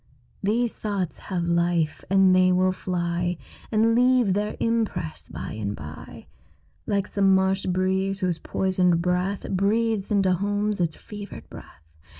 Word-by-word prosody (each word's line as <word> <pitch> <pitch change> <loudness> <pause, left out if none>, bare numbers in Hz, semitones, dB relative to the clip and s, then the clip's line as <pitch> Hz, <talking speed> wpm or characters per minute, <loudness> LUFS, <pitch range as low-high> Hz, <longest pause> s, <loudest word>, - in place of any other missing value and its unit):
These 230 +4 +1
thoughts 200 -5 -3
have 180 -3 -1
life; 170 -2 0
and 190 -1 +5
they 185 0 +5
will 185 +1 +3
fly 175 -1 -2 0.3
And 225 +1 +3
leave 245 -4 +4
their 210 +2 -2
impress 215 -8 -2
by - - -6
and 105 -1 -3
by, 75 +1 -10 0.6
Like 200 -1 +1
some 195 -2 +3
marsh 190 0 +1
breeze, 190 +2 0
whose 180 -3 0
poisoned 180 -3 +1
breath 180 +2 -1
Breathes 205 +2 +1
into 195 -3 +3
homes 205 +2 -1
its 165 -2 -1
fevered 205 -1 -9
breath. 80 - -13
190 Hz, 140 wpm, -25 LUFS, 180-205 Hz, 0.6 s, and